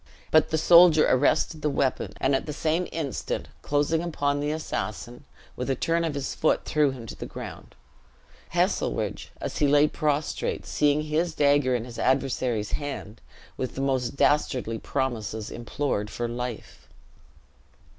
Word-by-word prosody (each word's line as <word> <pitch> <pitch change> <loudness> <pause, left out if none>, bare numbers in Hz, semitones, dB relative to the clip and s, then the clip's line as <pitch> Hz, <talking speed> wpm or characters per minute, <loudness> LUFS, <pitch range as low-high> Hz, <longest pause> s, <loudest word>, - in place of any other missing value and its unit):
But 155 -1 +5
the 160 - +1
soldier 170 -1 +7
arrested 145 +4 +2
the 150 - +1
weapon, 135 -2 -1
and 135 - +2
at 135 - 0
the 150 - -3
same 160 +4 0
instant 155 -4 -3
closing 145 +3 +1
upon 145 -4 -1
the 145 +1 -1
assassin, 120 -4 -4 0.3
with 125 - -4
a 135 - +2
turn 165 +6 0
of 160 -3 -2
his 140 -1 -3
foot 155 - +1
threw 150 -2 +2
him 130 -3 -7
to - - -7
the - - -7
ground. - - -9 0.7
Heselrigge, - - -1
as - - -4
he 145 - +4
lay 145 +1 +5
prostrate, 150 -1 -1
seeing 150 0 +2
his 155 +2 -1
dagger 145 -4 +3
in 120 -1 -2
his 120 -2 -9
adversary's 130 -5 0
hand, 135 -7 -5 0.4
with 130 - -4
the 135 - -3
most 130 -2 0
dastardly 125 -6 +1
promises 115 -5 -3
implored 120 -3 -2
for 120 +1 -3
life. 120 - -6
140 Hz, 155 wpm, -26 LUFS, 125-150 Hz, 0.7 s, soldier